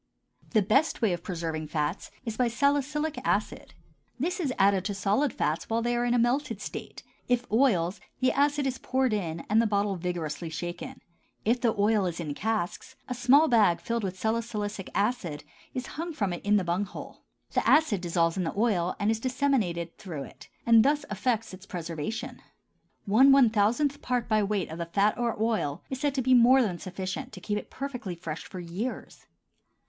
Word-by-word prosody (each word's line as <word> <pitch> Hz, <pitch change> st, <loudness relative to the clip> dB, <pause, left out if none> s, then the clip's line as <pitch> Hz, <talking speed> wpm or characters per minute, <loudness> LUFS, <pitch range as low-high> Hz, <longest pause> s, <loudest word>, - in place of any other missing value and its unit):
The 215 Hz, -3 st, +4 dB
best 270 Hz, +7 st, +2 dB
way 205 Hz, -5 st, +3 dB
of 175 Hz, -, -4 dB
preserving 165 Hz, -4 st, -4 dB
fats 150 Hz, +3 st, -2 dB, 0.2 s
is 225 Hz, -2 st, -3 dB
by 250 Hz, +1 st, +2 dB
salicylic 285 Hz, +5 st, 0 dB
acid. -, -, -1 dB, 0.4 s
This 350 Hz, +8 st, -1 dB
is 295 Hz, -7 st, 0 dB
added 195 Hz, -1 st, +4 dB
to 205 Hz, -, -2 dB
solid 210 Hz, +8 st, +1 dB
fats 155 Hz, -3 st, -2 dB
while 230 Hz, +1 st, 0 dB
they 240 Hz, 0 st, +1 dB
are 240 Hz, 0 st, +1 dB
in 245 Hz, 0 st, +2 dB
a -, -, +4 dB
melted 240 Hz, -1 st, +1 dB
state; -, -, -7 dB, 0.2 s
if 245 Hz, 0 st, +1 dB
oils, 205 Hz, -7 st, +2 dB, 0.2 s
the 255 Hz, 0 st, +3 dB
acid 285 Hz, 0 st, +2 dB
is 260 Hz, -1 st, -2 dB
poured 260 Hz, -2 st, 0 dB
in 170 Hz, -5 st, -3 dB
and 215 Hz, +2 st, +4 dB
the 230 Hz, -, +2 dB
bottle 200 Hz, -2 st, 0 dB
vigorously 170 Hz, -2 st, -3 dB
shaken. 175 Hz, +2 st, -6 dB, 0.4 s
If 240 Hz, +3 st, +2 dB
the 230 Hz, -3 st, +2 dB
oil 205 Hz, -1 st, +3 dB
is 170 Hz, -1 st, -4 dB
in 155 Hz, -4 st, -3 dB
casks, 220 Hz, -, -3 dB
a 250 Hz, -, -2 dB
small 260 Hz, +6 st, +5 dB
bag 210 Hz, -, +4 dB
filled 230 Hz, +5 st, -2 dB
with 190 Hz, -1 st, -3 dB
salicylic 215 Hz, -2 st, -2 dB
acid 200 Hz, -7 st, -1 dB, 0.3 s
is 255 Hz, -1 st, -3 dB
hung 330 Hz, +6 st, -5 dB
into 200 Hz, -4 st, 0 dB
it 175 Hz, -, -7 dB
from 205 Hz, +1 st, +4 dB
the 195 Hz, -, +1 dB
bung 175 Hz, +3 st, 0 dB
hole. 185 Hz, -, -10 dB, 0.3 s
The -, -, +2 dB
acid 300 Hz, -, +4 dB
dissolves 170 Hz, -1 st, +1 dB
in 185 Hz, -, 0 dB
the 170 Hz, +4 st, -4 dB
oil 190 Hz, -6 st, +1 dB
and 205 Hz, +1 st, +2 dB
is 225 Hz, -, -1 dB
disseminated 230 Hz, -10 st, -1 dB
through 160 Hz, -8 st, -6 dB
it -, -, -13 dB, 0.2 s
and 230 Hz, -1 st, +7 dB
thus 290 Hz, +2 st, +2 dB
effects 225 Hz, 0 st, -1 dB
its 185 Hz, +1 st, -11 dB
preservation. 170 Hz, +7 st, -5 dB, 0.6 s
One 250 Hz, +7 st, +6 dB
one 270 Hz, -5 st, +6 dB
thousandth 240 Hz, +7 st, +1 dB
part 245 Hz, -2 st, -1 dB
by 215 Hz, -2 st, +3 dB
weight 200 Hz, -4 st, -1 dB
of 160 Hz, -, -7 dB
the 170 Hz, -, -3 dB
fat 200 Hz, +5 st, +2 dB
or 235 Hz, -3 st, -1 dB
oil 215 Hz, -9 st, -1 dB
is 265 Hz, -, -3 dB
said 285 Hz, 0 st, 0 dB
to 260 Hz, -, 0 dB
be 260 Hz, +1 st, +4 dB
more 250 Hz, +2 st, +7 dB
than 180 Hz, -6 st, -2 dB
sufficient 185 Hz, 0 st, -5 dB
to 190 Hz, -, -8 dB
keep 210 Hz, +3 st, -2 dB
it -, -, -12 dB
perfectly 250 Hz, -9 st, -5 dB
fresh 165 Hz, -2 st, -6 dB
for 185 Hz, -, -8 dB
years. 180 Hz, +9 st, -6 dB
215 Hz, 195 wpm, -28 LUFS, 180-250 Hz, 0.6 s, and